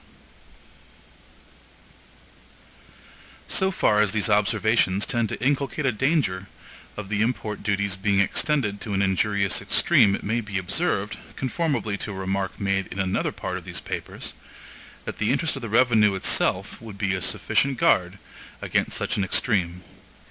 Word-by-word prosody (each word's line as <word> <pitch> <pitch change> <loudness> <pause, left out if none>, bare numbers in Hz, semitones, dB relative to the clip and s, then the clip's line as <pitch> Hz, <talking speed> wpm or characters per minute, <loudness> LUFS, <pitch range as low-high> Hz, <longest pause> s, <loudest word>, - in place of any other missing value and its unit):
So 190 -1 +1
far 105 - +2
as 105 -2 +1
these 105 -1 +1
observations 105 -1 +2
tend 115 -2 0
to - - -5
inculcate 140 +1 0
a 130 - +3
danger 110 - 0 0.5
of 105 -2 -5
the 105 0 0
import 110 -2 -2
duties 100 -1 0
being 100 0 +1
extended 105 0 +1
to 105 -3 -3
an 100 - +2
injurious 100 0 +1
extreme 100 -1 +4
it - - -8
may 115 +3 0
be 105 -3 -4
observed, 100 - -1 0.2
conformably 130 -7 -1
to 105 - -4
a - - -7
remark 95 0 -3
made 95 -1 0
in - - -9
another 95 -1 0
part - - -4
of - - -9
these - - -6
papers, - - -6 0.7
that - - -6
the 105 - +1
interest 145 +3 0
of 135 - -6
the 115 - -5
revenue 110 -3 +4
itself 95 - 0
would 110 -3 -9
be 100 -2 0
a 95 - -2
sufficient 135 +9 +1
guard 90 -2 +2 0.5
against - - 0
such - - -1
an 100 - +1
extreme. 90 -3 0
105 Hz, 150 wpm, -24 LUFS, 95-120 Hz, 0.7 s, extreme